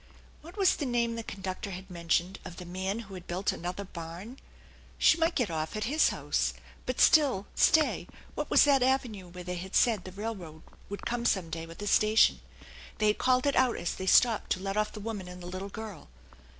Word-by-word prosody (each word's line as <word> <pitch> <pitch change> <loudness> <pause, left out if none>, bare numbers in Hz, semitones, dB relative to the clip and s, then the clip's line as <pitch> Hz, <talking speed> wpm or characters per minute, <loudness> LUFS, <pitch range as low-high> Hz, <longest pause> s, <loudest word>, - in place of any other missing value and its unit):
What 340 +6 -13
was 385 -2 +3
the 290 - -2
name 235 -1 +1
the 230 - -3
conductor 190 -2 -5
had 190 0 -8
mentioned 175 +2 -1
of 180 -2 -9
the 180 - -8
man 190 +5 -3
who 200 -3 -12
had 180 -2 -9
built 185 +3 -1
another 180 +3 -5
barn? 180 +7 -9 0.6
She 325 - +5
might 330 +1 +2
get 235 -9 0
off 155 +2 -3
at 215 - -2
his 295 +7 +3
house, - - -1 0.3
but - - -2
still 280 - +5
stay 315 -1 +3 0.3
what - - -4
was - - +6
that 280 -2 +4
avenue 245 -7 0
where 180 +1 -9
they 180 0 -4
had 190 +2 -6
said 225 -7 +3
the 185 - -8
railroad 185 -6 -6 0.3
would 200 - -7
come 240 0 -2
some 190 -8 0
day 165 +1 -5
with 165 - -12
a - - -3
station? 215 +2 +4 0.6
They 215 0 +3
had 210 - 0
called 255 +1 +3
it 280 - +2
out 255 -2 +3
as 175 - -2
they 190 - -6
stopped 230 +2 +4
to - - -6
let 195 +1 -3
off 215 0 0
the 215 - -8
woman 205 -3 -5
and 180 0 -9
the 175 - -10
little 185 +2 -6
girl. 215 -5 -8
200 Hz, 215 wpm, -29 LUFS, 180-235 Hz, 0.6 s, was